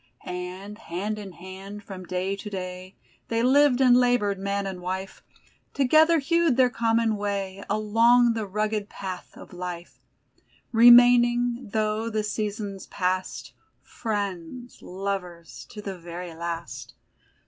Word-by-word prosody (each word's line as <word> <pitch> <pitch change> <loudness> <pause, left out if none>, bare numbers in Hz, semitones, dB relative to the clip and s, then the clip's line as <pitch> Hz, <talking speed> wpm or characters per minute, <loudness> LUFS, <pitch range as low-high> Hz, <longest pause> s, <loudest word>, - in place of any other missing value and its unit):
And, 185 +4 -6
hand 210 +3 -4
in 195 -3 -9
hand, 190 +3 -10
from 185 -3 -9
day 185 +2 -2
to 205 +1 -8
day, 185 -1 -7 0.3
They 230 0 0
lived 270 0 +4
and 250 -2 +6
labored, 245 -6 +2
man 200 0 -2
and 190 -2 -5
wife; 190 +2 -5 0.5
Together 310 +5 +5
hewed 330 -2 +2
their 255 -2 +4
common 230 -2 +1
way 200 -1 -3
Along 230 +3 +4
the 220 -2 -3
rugged 210 +1 -2
path 185 -2 -7
of - - -13
Life; 175 -1 -7 0.7
Remaining, 240 0 +6
though 215 +1 -1
the 215 -1 -1
seasons 210 -2 -4
pass'd, 185 -1 -2 0.3
Friends, 205 +2 -5
lovers, 180 -3 -6
to 210 - -9
the 195 -3 -6
very 175 0 -7
last. 170 0 -6
205 Hz, 125 wpm, -25 LUFS, 185-235 Hz, 0.7 s, and